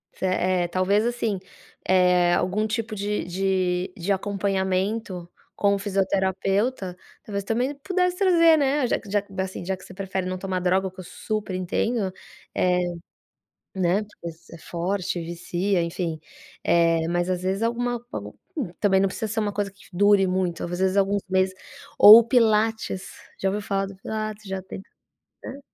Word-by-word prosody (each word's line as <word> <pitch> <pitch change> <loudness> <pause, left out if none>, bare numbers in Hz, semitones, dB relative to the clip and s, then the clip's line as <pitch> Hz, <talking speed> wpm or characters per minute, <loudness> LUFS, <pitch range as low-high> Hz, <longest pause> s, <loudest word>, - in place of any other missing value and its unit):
Se - - -4
é 185 -1 +1
talvez 185 +5 +1
assim, 235 -4 -1 0.5
eh, 180 -1 +4
algum 210 +4 0
tipo 225 0 -3
de 205 +1 -2
de 185 0 0
de 185 +3 -2
acompanhamento 195 -1 -1 0.3
com 200 0 +2
o - - -3
fisioterapeuta, 195 +1 0 0.3
talvez 200 -2 -4
também 245 +7 -1
pudesse 360 +4 0
trazer, 335 -4 +5
né, 280 -2 +2
já - - 0
que - - -15
que 195 -2 -1
assim, 190 -1 -5
já 190 +1 -2
que 185 - -16
você - - -12
prefere 190 -1 -3
não 185 0 -3
tomar 185 0 -2
droga, 185 +1 +1
o - - -7
que 185 - -16
eu - - -6
super 210 +2 -4
entendo, 190 +3 -1 0.4
eh, 180 0 +2 1.0
né. 185 +2 +1
Porque 205 -5 -9
às - - -6
vezes 165 - -22
é 170 - -10
forte, 175 +2 -2
vicia, 175 +3 -1
enfim, 170 -1 -3 0.5
eh, 165 -1 +3
mas 175 +1 0
às 180 -1 -1
vezes 190 +3 -1
alguma, 240 +1 -1
algum 105 0 -5 0.2
não 195 - +1
precisa 220 +4 -4
ser 220 +2 -1
uma 205 -1 -1
coisa 200 0 -2
que 200 0 -20
dure 200 +1 +4
muito, 185 -2 -1
às 175 - -5
vezes 190 +1 +2
alguns 200 0 +2
meses, 185 0 +1 0.4
ou 215 +2 +12
o - - -1
pilates, 220 -4 +2 0.3
já 195 - 0
ouviu 205 +2 -2
falar 195 -1 -1
do 195 - -9
pilates? 215 +1 -5
Já 190 0 -3
tenta, 190 +1 -10 0.6
né. 275 - -7
195 Hz, 170 wpm, -24 LUFS, 185-215 Hz, 1.0 s, ou